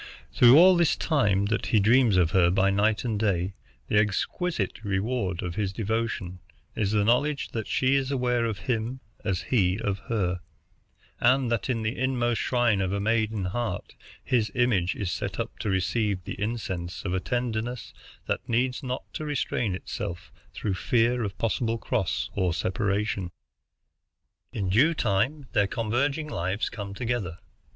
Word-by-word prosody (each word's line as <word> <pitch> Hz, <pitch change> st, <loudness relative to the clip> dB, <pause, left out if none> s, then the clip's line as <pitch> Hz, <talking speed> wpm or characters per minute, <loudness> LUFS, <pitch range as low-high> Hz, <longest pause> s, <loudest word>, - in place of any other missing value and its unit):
Through 125 Hz, +3 st, +7 dB
all 185 Hz, +2 st, +8 dB
this 170 Hz, -2 st, +3 dB
time 105 Hz, -11 st, +2 dB
that -, -, -1 dB
he 110 Hz, -, +3 dB
dreams 115 Hz, 0 st, +4 dB
of 85 Hz, -2 st, +3 dB
her 90 Hz, -3 st, +4 dB
by 95 Hz, +2 st, +3 dB
night 105 Hz, +3 st, +1 dB
and 110 Hz, -4 st, -1 dB
day, 95 Hz, -3 st, 0 dB, 0.3 s
the 105 Hz, -, +3 dB
exquisite 110 Hz, -, -1 dB
reward 100 Hz, -2 st, -1 dB
of 90 Hz, -1 st, -3 dB
his 100 Hz, -1 st, -1 dB
devotion 105 Hz, -3 st, -2 dB, 0.4 s
is 105 Hz, -3 st, 0 dB
the 105 Hz, 0 st, +2 dB
knowledge 140 Hz, +5 st, +1 dB
that 110 Hz, -3 st, -4 dB
she 130 Hz, +1 st, +2 dB
is 135 Hz, -1 st, +1 dB
aware 125 Hz, -3 st, +1 dB
of 110 Hz, -3 st, -2 dB
him 120 Hz, 0 st, -2 dB, 0.2 s
as 95 Hz, -4 st, -1 dB
he 95 Hz, -5 st, +1 dB
of 100 Hz, -3 st, -2 dB
her, 90 Hz, -6 st, 0 dB, 0.8 s
and 130 Hz, 0 st, +3 dB
that 115 Hz, +1 st, -1 dB
in 115 Hz, -3 st, 0 dB
the 110 Hz, +1 st, -1 dB
inmost 120 Hz, -2 st, 0 dB
shrine 120 Hz, -5 st, +2 dB
of 95 Hz, -1 st, -1 dB
a 100 Hz, -, -1 dB
maiden 110 Hz, -1 st, 0 dB
heart 105 Hz, 0 st, -3 dB, 0.3 s
his 115 Hz, -4 st, +1 dB
image 105 Hz, -8 st, +2 dB
is 95 Hz, -4 st, -3 dB
set -, -, -4 dB
up -, -, -4 dB
to 105 Hz, -, -2 dB
receive 95 Hz, +1 st, 0 dB
the 100 Hz, -, -7 dB
incense 95 Hz, -6 st, -3 dB
of 90 Hz, -, -1 dB
a 95 Hz, -, +1 dB
tenderness 120 Hz, +1 st, -3 dB, 0.3 s
that -, -, -3 dB
needs 125 Hz, +2 st, +1 dB
not 130 Hz, -1 st, -4 dB
to -, -, -4 dB
restrain 125 Hz, -8 st, -1 dB
itself 85 Hz, -5 st, -6 dB, 0.2 s
through 105 Hz, -, -2 dB
fear 120 Hz, +5 st, +1 dB
of 100 Hz, -3 st, -4 dB
possible 115 Hz, 0 st, 0 dB
cross 115 Hz, -5 st, -1 dB
or 90 Hz, -3 st, 0 dB
separation. 100 Hz, 0 st, -1 dB, 1.2 s
"In 100 Hz, -3 st, -2 dB
due 140 Hz, -, +4 dB
time 130 Hz, +7 st, 0 dB
their 105 Hz, -4 st, +3 dB
converging 135 Hz, +8 st, -1 dB
lives 95 Hz, -, -2 dB
come 100 Hz, -2 st, -7 dB
together. 115 Hz, -7 st, -2 dB
110 Hz, 160 wpm, -27 LUFS, 95-125 Hz, 1.2 s, all